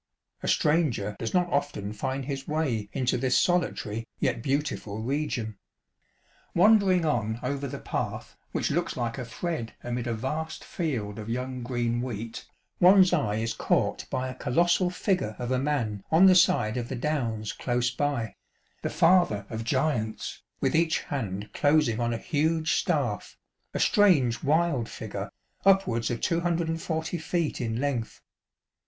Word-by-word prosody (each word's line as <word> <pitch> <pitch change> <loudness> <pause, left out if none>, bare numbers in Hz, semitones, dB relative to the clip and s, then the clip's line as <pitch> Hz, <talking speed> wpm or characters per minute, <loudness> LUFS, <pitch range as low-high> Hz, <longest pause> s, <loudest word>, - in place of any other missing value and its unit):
A - - -4
stranger 145 -10 +2
does 115 - -3
not 180 -1 +2
often 140 -8 -1
find 130 +4 -3
his 135 -1 -4
way 135 -10 -1
into 125 -2 0
this 125 0 +3
solitary, 115 - 0
yet 125 -4 0
beautiful, 135 -6 -2
region. 120 -4 -2 1.0
Wandering 190 -2 +5
on 115 -6 0
over 140 +2 -2
the - - -5
path - - -4 0.2
which - - -1
looks - - -1
like 120 +2 -2
a 125 - -4
thread 115 0 -4
amid 120 0 -3
a 120 - 0
vast 150 +7 -4
field 115 - -3
of 110 +1 -7
young 125 +2 -3
green 120 -1 -1
wheat, 115 -2 -5 0.3
one's 185 +1 +7
eye 105 -1 +1
is 115 +1 -1
caught - - 0
by 130 0 -2
a 130 - -5
colossal 170 +8 +2
figure 180 - -1
of 125 0 -4
a 130 - +2
man 120 -8 -1
on 165 +4 +6
the 190 - +8
side 110 -10 +4
of 120 -1 -3
the 135 - -3
Downs 120 -6 -2
close 125 0 0
by 140 -1 0
ŌĆö 110 - -7 0.5
the - - -2
Father 165 - +3
of 110 0 -3
Giants, 120 -3 -1 0.2
with - - +1
each 165 0 +2
hand 105 -8 -4
closing 145 -6 +3
on 120 0 0
a 115 - -1
huge 160 +5 0
staff, - - -1 0.3
a - - -3
strange 160 - +4
wild 150 -5 +1
figure, - - -6 0.3
upwards 190 -13 +3
of 120 - -3
240 165 -1 -1
feet 165 -2 -1
in 115 -1 -2
length. 130 -5 -2
130 Hz, 155 wpm, -27 LUFS, 115-160 Hz, 1.0 s, the